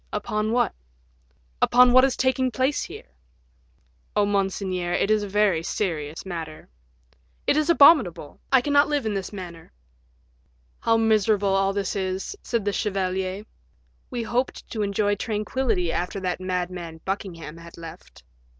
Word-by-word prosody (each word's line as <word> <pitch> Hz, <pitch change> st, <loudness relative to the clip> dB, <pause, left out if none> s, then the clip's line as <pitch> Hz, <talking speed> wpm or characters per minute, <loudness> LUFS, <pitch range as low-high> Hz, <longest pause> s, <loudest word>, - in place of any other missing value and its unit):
"Upon 215 Hz, 0 st, -2 dB
what?" 245 Hz, -, +1 dB, 0.9 s
"Upon 250 Hz, 0 st, +6 dB
what 255 Hz, 0 st, +7 dB
is 270 Hz, -2 st, +2 dB
taking 260 Hz, 0 st, +1 dB
place 260 Hz, +5 st, 0 dB
here." -, -, -11 dB, 1.0 s
"Oh, 205 Hz, -, +3 dB
monseigneur, 190 Hz, -3 st, -1 dB
it 200 Hz, +3 st, +1 dB
is 215 Hz, -1 st, +3 dB
a 205 Hz, -, -4 dB
very 200 Hz, -4 st, +2 dB
serious 165 Hz, -4 st, -3 dB
matter." 165 Hz, -4 st, -7 dB, 0.8 s
"It -, -, +3 dB
is 305 Hz, +2 st, +1 dB
abominable! 255 Hz, -, +5 dB
I 265 Hz, -, +6 dB
cannot 285 Hz, +2 st, +3 dB
live 290 Hz, -4 st, -1 dB
in 215 Hz, -, -1 dB
this 195 Hz, -2 st, -4 dB
manner." 175 Hz, -5 st, -9 dB, 1.1 s
"How 225 Hz, 0 st, +2 dB
miserable 215 Hz, -3 st, +2 dB
all 195 Hz, 0 st, +2 dB
this 200 Hz, 0 st, -2 dB
is," 190 Hz, -, -3 dB
said 230 Hz, -4 st, -2 dB
the 205 Hz, -, 0 dB
chevalier. 190 Hz, 0 st, -2 dB, 0.6 s
"We 240 Hz, -2 st, -3 dB
hoped 245 Hz, +3 st, -2 dB
to 220 Hz, -, -3 dB
enjoy 205 Hz, 0 st, 0 dB
tranquillity 215 Hz, -4 st, -1 dB
after 180 Hz, +3 st, -2 dB
that 185 Hz, 0 st, -2 dB
madman 180 Hz, -3 st, -4 dB
Buckingham 170 Hz, -5 st, -5 dB
had 170 Hz, 0 st, -13 dB
left." 165 Hz, -1 st, -12 dB
200 Hz, 140 wpm, -24 LUFS, 180-230 Hz, 1.1 s, what